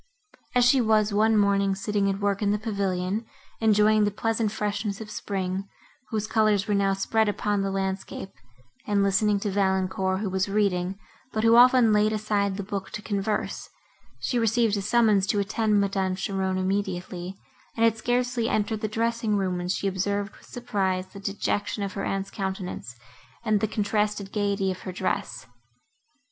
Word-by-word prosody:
As 245 -1 +5
she 255 +1 +5
was, 215 -2 +2
one 220 +1 +3
morning, 200 -1 +2
sitting 200 0 0
at 195 0 -2
work 205 0 0
in 205 - +2
the 205 - +2
pavilion, 200 -1 -2 0.4
enjoying 215 -1 +4
the 205 - +3
pleasant 220 +1 -1
freshness 210 -1 -2
of 215 -1 -8
spring, 190 -1 -3 0.4
whose 215 -2 -1
colours 215 -3 +2
were 210 - +1
now 200 -1 +2
spread 215 +3 +1
upon 205 0 0
the 195 - -1
landscape, 195 0 -3 0.6
and 205 -1 +2
listening 200 +1 +2
to 205 - -1
Valancourt, 190 -1 0
who 210 - -1
was 190 +1 0
reading, 195 -2 0 0.3
but 215 - -1
who 230 0 +6
often 245 -2 +6
laid 210 +1 +3
aside 205 -2 0
the 200 - -3
book 195 0 -5
to 210 - -5
converse, 205 0 -2 0.5
she 245 - -1
received 225 -1 +2
a 200 - -1
summons 210 -2 +3
to 205 - +1
attend 210 +1 +1
Madame 195 -2 0
Cheron 190 0 -1
immediately, 185 -1 -2 0.4
and 225 - +2
had 230 -1 +4
scarcely 245 0 0
entered 215 0 0
the 215 - 0
dressing 225 0 0
room, 185 -2 -1
when 175 - -4
she 200 - -1
observed 200 +1 -2
with - - -18
surprise 190 -6 -2
the 200 - -11
dejection 200 +1 -2
of 200 - -4
her 195 - -4
aunt's 195 0 -2
countenance, 190 - -5 0.5
and 215 -2 +3
the 215 - 0
contrasted 210 -1 -1
gaiety 200 -2 0
of 185 - -6
her 185 - -6
dress. 185 -7 -3
205 Hz, 170 wpm, -26 LUFS, 195-215 Hz, 0.6 s, who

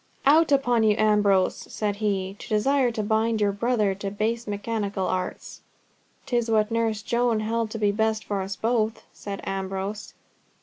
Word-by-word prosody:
"Out 305 +3 +5
upon 245 -4 +3
you, 215 -1 +4
Ambrose!" 205 -3 +3 0.2
said 205 -2 -2
he, 195 -2 -1
"to - - -10
desire 255 +5 +2
to 225 -2 -3
bind 220 +1 +1
your 205 -1 +2
own 200 - -10
brother 215 -3 +1
to 195 +1 -5
base 220 +3 -2
mechanical 205 -2 -2
arts." 185 0 -4 0.6
"'Tis 240 -2 0
what 215 0 +2
Nurse 225 -2 0
Joan 235 -2 +1
held 225 +1 -1
to 225 - -5
be 205 -2 +2
best 220 +1 0
for 200 -2 -2
us 195 +1 -4
both," 225 -1 0
said 200 -1 -7
Ambrose. 195 +2 -4
215 Hz, 170 wpm, -25 LUFS, 200-230 Hz, 0.6 s, Out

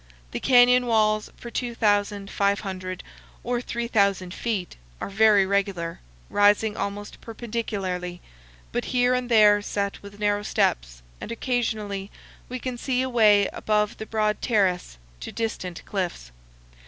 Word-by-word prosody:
The - - -3
canyon 250 -1 +5
walls 215 -2 +2
for 235 - -9
2,500 200 -5 -1 0.4
or 240 0 -1
3,000 200 -7 0
feet 205 -7 -3 0.2
are - - -4
very 205 -1 +5
regular, 190 -4 -1 0.3
rising 205 +1 +3
almost 200 +1 -5
perpendicularly, 200 -6 -4 0.5
but - - -2
here 250 0 +2
and 250 -1 -1
there 210 -3 +6
set 200 -1 -3
with 200 0 -12
narrow 205 0 +1
steps, - - -1 0.2
and - - -6
occasionally 220 -5 -2 0.4
we 255 - -4
can 250 -1 -5
see 255 0 0
away 215 -6 +4
above 210 -1 0
the 220 - -7
broad 215 -1 0
terrace 190 - +1 0.2
to - - -7
distant 185 -6 -4
cliffs. 175 - -4
205 Hz, 125 wpm, -25 LUFS, 195-230 Hz, 0.5 s, there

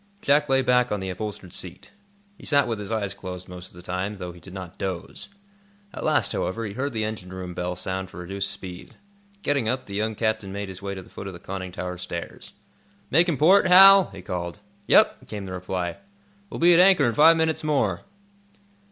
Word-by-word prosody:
Jack 145 -3 +2
lay 135 0 +3
back 125 -1 +2
on 105 - -1
the 95 -1 -4
upholstered 95 -1 -6
seat. 90 -2 -7 0.4
He - - -18
sat 145 -2 +2
with 115 -3 -3
his 105 +1 -6
eyes 105 -3 -1
closed 90 -1 -8
most 90 0 -9
of - - -16
the 90 - -12
time, 95 +3 -3
though 90 -2 -6
he 90 - -14
did 90 +3 -12
not 95 -3 -9
doze. 95 - -5 0.6
At - - -6
last, 145 -10 +2
however, 115 +5 -2
he 100 - -5
heard 135 +5 -2
the 110 -3 -2
engine 105 -4 -5
room 90 -1 -6
bell 90 +1 -3
sound 95 +1 -4
for - - -13
reduced 95 +3 -3
speed. 90 -1 -9 0.5
Getting 140 -6 +1
up, 130 +1 -2
the 100 - -10
young 110 +2 -1
captain 110 -3 -1
made 100 0 -5
his 95 0 -8
way 100 0 -4
to 95 - -8
the - - -19
foot 100 - -8
of 95 - -6
the 85 - -10
conning 95 0 -6
tower 90 0 -5
stairs. 85 -1 -7 0.6
"Making 165 +1 +3
port, 185 +7 +5
Hal?" 195 +1 +9
he 95 -1 -11
called. 85 -3 -4 0.3
"Yep," - - +4
came 105 -2 -6
the 95 - -7
reply. 90 -1 -3 0.5
"We'll - - -7
be 175 +1 +6
at 170 - +5
anchor 185 -5 +6
in 120 - +1
five 160 +7 +6
minutes 160 0 0
more." 125 - 0
100 Hz, 215 wpm, -24 LUFS, 90-130 Hz, 0.6 s, Hal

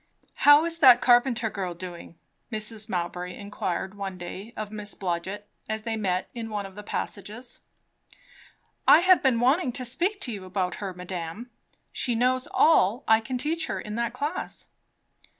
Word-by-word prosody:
"How 290 +2 +6
is 335 0 -2
that 255 -5 +8
Carpenter 240 -2 +3
girl 185 -4 -4
doing?" 175 -1 -9 0.4
Mrs. 215 0 -3
Mowbray 180 0 -3
inquired 190 -2 -4
one 195 -2 -5
day 185 +5 -8
of 215 -1 -5
Miss 210 -1 -3
Blodgett, 190 +3 -4 0.2
as 220 0 -3
they 225 -1 -2
met 185 -4 -1
in 230 -2 -5
one 205 -2 -3
of 195 - -10
the 210 - -8
passages. 215 +4 -5 1.3
"I 310 - +8
have 370 0 +6
been 260 -5 +3
wanting 260 +4 +3
to 255 - -3
speak 350 - -1
to 250 - -4
you 200 -4 -6
about 185 -1 -2
her, 195 -2 -3
madame. 180 +5 -6 0.4
She 245 - 0
knows 255 +4 +1
all 265 - +4
I 220 0 +6
can 250 +3 -4
teach 320 +5 -2
her - - -3
in 210 - -7
that 235 +1 -1
class." 300 +5 -4
220 Hz, 170 wpm, -26 LUFS, 190-255 Hz, 1.3 s, that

